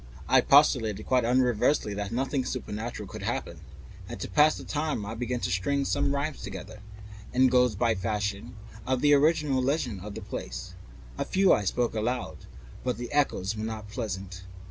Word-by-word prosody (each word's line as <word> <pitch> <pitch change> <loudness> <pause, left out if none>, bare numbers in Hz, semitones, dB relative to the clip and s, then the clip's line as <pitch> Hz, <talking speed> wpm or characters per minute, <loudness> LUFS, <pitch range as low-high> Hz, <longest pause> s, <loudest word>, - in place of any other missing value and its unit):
I - - +5
postulated 125 -8 +4
quite 125 -2 +2
unreservedly 125 -1 +2
that 100 0 -4
nothing 130 +2 -1
supernatural 115 -3 -5
could - - -8
happen, - - -3 0.5
and - - -7
to - - -4
pass 150 +1 +4
the - - -8
time 150 -8 -2
I 105 - -5
began 120 0 -3
stringing 95 +11 0
some 140 0 +1
rhymes 145 +1 -3
together, 100 +2 -8 0.5
Ingoldsby 125 -3 +4
fashion, 100 +2 -3 0.2
concerning 130 +3 -2
the 145 0 +5
original 145 -2 +3
legend 130 - -1
of 105 +1 -7
the - - -6
place. - - -6 0.5
A - - +1
few 190 0 +4
I 105 - +1
spoke 120 +4 0
aloud, 110 - -3 0.4
but 125 -1 -1
the 120 0 -6
echoes 110 -8 +1
were 110 - -4
not 110 -1 -5
pleasant. 95 -5 -5
120 Hz, 165 wpm, -28 LUFS, 105-135 Hz, 0.5 s, I